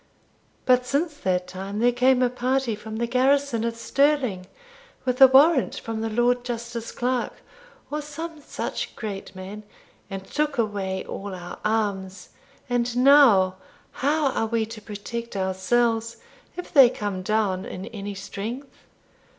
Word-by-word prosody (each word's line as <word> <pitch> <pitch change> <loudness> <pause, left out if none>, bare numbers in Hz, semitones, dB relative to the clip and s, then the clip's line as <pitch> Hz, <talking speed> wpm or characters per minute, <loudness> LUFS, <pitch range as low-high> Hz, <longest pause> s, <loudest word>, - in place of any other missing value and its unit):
But 250 -1 +4
since 295 +5 0
that 180 -6 0
time 190 +3 -6
there 240 +3 +4
came 255 +1 +3
a 250 - +3
party 255 -1 0
from 215 +1 -7
the 235 +2 -1
garrison 255 0 +2
at 230 0 -1
Stirling, 255 -6 +1 0.6
with 255 0 -1
a 265 - +12
warrant 270 +2 +5
from 225 -1 -5
the 225 - -2
Lord 240 +2 +2
Justice 235 -1 -5
Clerk, 250 0 -1 0.6
or 300 +1 -2
some 305 +2 -7
such - - -5
great 200 -3 -6
man, 190 +3 -8 0.5
and 195 -1 -6
took 300 +2 -1
away 200 -4 -2
all 195 -1 -6
our 175 -1 -8
arms; 200 -4 -2 0.4
and 245 -1 -1
now, 250 -9 +6 0.3
how 290 +1 +1
are 225 - -1
we 225 0 0
to 220 0 -9
protect 225 +3 -6
ourselves 225 +5 0 0.4
if 360 - -7
they 270 -5 +8
come 205 -5 -4
down 195 -2 0
in 185 - -7
any 205 -3 -6
strength?' 230 +8 -7
230 Hz, 145 wpm, -24 LUFS, 200-255 Hz, 0.6 s, a